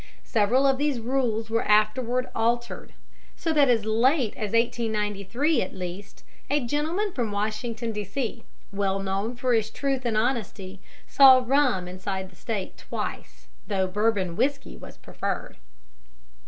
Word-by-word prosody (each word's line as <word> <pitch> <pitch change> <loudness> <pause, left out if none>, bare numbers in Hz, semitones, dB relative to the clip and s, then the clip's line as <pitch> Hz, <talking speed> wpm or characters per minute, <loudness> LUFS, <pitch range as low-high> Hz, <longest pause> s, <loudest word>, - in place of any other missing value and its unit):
Several 235 +5 +2
of 270 -1 +3
these 290 -4 0
rules 230 -2 -1
were 230 - +2
afterwards 235 +4 +2
altered, 235 +1 -1 0.4
so 325 - -1
that 285 -3 +4
as 225 -3 +2
late 235 +2 +2
as 210 -2 -4
1893 230 - 0
at 185 - -4
least 185 +2 -7 0.3
a 285 -2 +1
gentleman 320 - -1
from 235 -5 -2
Washington, 220 +3 -2
D.C., 220 +3 -4 0.3
well 195 -1 0
known 195 +4 -2
for 250 0 0
his 220 -1 +1
truth 270 +1 -2
and 230 -3 0
honesty, 215 -5 -2 0.3
saw 260 -2 +7
rum 250 -9 +2
inside 190 +1 -5
the - - -20
State 205 0 -5
twice, - - -6 0.2
though 195 -2 0
Bourbon 195 -2 0
whiskey 275 +6 -1
was - - -12
preferred. - - -5
225 Hz, 140 wpm, -26 LUFS, 205-255 Hz, 0.4 s, saw